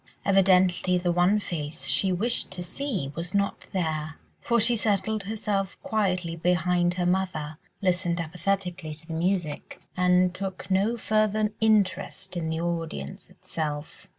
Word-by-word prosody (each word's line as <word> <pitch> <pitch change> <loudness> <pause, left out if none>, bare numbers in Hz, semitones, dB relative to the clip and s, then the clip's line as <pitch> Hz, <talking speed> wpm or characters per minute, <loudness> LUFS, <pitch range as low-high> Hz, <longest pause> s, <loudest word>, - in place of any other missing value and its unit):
Evidently 185 -2 +4
the 175 0 +1
one 175 +4 +4
face 155 -7 -4
she 190 - +2
wished 225 +7 0
to 185 -1 -5
see 190 - -3
was 170 +5 -5
not 200 0 0
there, 160 -4 -2 0.3
for 235 0 +2
she 235 +2 +4
settled 215 0 +1
herself 200 -2 -1
down - - -38
quietly 185 -7 0
behind 175 +1 +2
her 180 -1 0
mother, 175 -5 -1 0.2
listened 180 -2 +1
apathetically 180 -1 -2
to 160 - -14
the 165 - -6
music, 170 -2 -1 0.2
and 180 0 +4
took 190 0 -5
no 205 +5 +2
further 215 -1 +1
interest 195 -3 +1
in 165 -2 -2
the 160 0 -1
audience 165 - -4
itself. 150 -2 -5
180 Hz, 145 wpm, -27 LUFS, 170-200 Hz, 0.3 s, Evidently